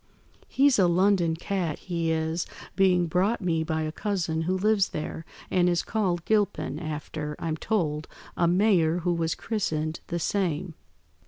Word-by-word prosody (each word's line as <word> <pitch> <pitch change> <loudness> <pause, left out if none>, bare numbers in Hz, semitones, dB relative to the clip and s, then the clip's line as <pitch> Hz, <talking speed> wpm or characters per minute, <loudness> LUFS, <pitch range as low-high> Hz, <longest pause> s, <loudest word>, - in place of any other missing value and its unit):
He's 275 -3 +3
a 185 - +5
London 175 -1 +3
cat, 175 -2 -2
he 170 -3 -2
is, 160 +1 -1 0.3
being 185 -2 +4
brought 185 +8 +1
me 165 -4 0
by 160 0 -1
a 155 - -2
cousin 170 -4 -1
who 185 - +2
lives 205 0 +2
there, 155 +1 -5 0.3
and 180 -1 +3
is 175 -1 +1
called 185 -6 -1
Gilpin, 205 -8 0
after, 150 -1 -5
I'm 165 -2 -2
told, 160 -5 -1 0.3
a 170 - +2
mayor 175 -3 +3
who 175 +1 +1
was 165 -1 -1
christened 160 -7 -2
the 170 - -2
same. 175 -2 -1
175 Hz, 155 wpm, -27 LUFS, 160-195 Hz, 0.3 s, a